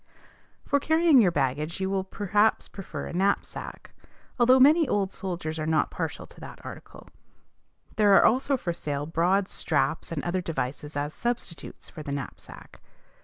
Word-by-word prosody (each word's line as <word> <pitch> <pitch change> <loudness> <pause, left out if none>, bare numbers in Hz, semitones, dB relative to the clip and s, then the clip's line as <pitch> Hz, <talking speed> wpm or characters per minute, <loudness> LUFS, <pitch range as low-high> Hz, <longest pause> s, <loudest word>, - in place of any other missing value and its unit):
For 285 - +2
carrying 315 -2 +5
your 195 - +4
baggage 150 +2 -1
you 190 - -1
will 190 0 -1
perhaps 205 +2 +1
prefer 165 -7 -7
a - - -7
knapsack, 195 +3 -2 0.5
though 255 +2 +6
many 305 +4 +6
old 200 -4 0
soldiers 170 -4 -4
are 155 - -2
not 160 -1 +1
partial - - -4
to - - -17
that - - -9
article. - - -10 0.9
There 205 -2 +6
are - - +6
also 265 +4 +3
for 175 -8 -3
sale 145 -3 -4
broad 180 +5 +1
straps - - -1
and - - -3
other 180 +1 -1
devices 150 -3 -4
as 145 +1 -2
substitutes 235 -10 -4
for 155 - -9
the 145 -2 -6
knapsack. 140 -2 -8
185 Hz, 160 wpm, -27 LUFS, 155-220 Hz, 0.9 s, though